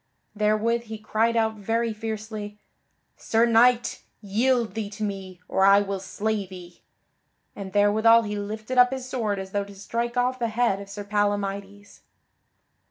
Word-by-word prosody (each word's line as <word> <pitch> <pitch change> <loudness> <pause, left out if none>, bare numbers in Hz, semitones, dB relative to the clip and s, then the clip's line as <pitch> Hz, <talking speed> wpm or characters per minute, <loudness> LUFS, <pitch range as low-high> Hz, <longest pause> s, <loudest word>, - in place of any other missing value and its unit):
Therewith 215 +3 +1
he 220 0 -7
cried 225 +2 0
out 220 -1 +1
very 225 +2 -1
fiercely: 215 -1 -6 0.6
"Sir 225 +1 +2
Knight, 235 +1 +3 0.2
yield 230 +3 +1
thee 220 -2 -4
to 205 +1 -6
me, 190 -3 -5
or 190 - +1
I 200 +1 +7
will 200 -1 -3
slay 205 +1 -2
thee." 180 -2 -12 0.7
And 195 -2 -7
therewithal 220 +3 +5
he 210 -1 -4
lifted 215 +5 -3
up 250 0 +7
his 260 -1 -5
sword 220 -6 -2
as 190 0 -6
though 200 0 0
to 200 0 -12
strike 235 +4 -3
off 250 +1 +1
the 235 - 0
head 225 -3 +1
of 200 - -10
Sir 205 +1 -6
Palamydes. 205 -1 -2
215 Hz, 160 wpm, -25 LUFS, 200-230 Hz, 0.7 s, I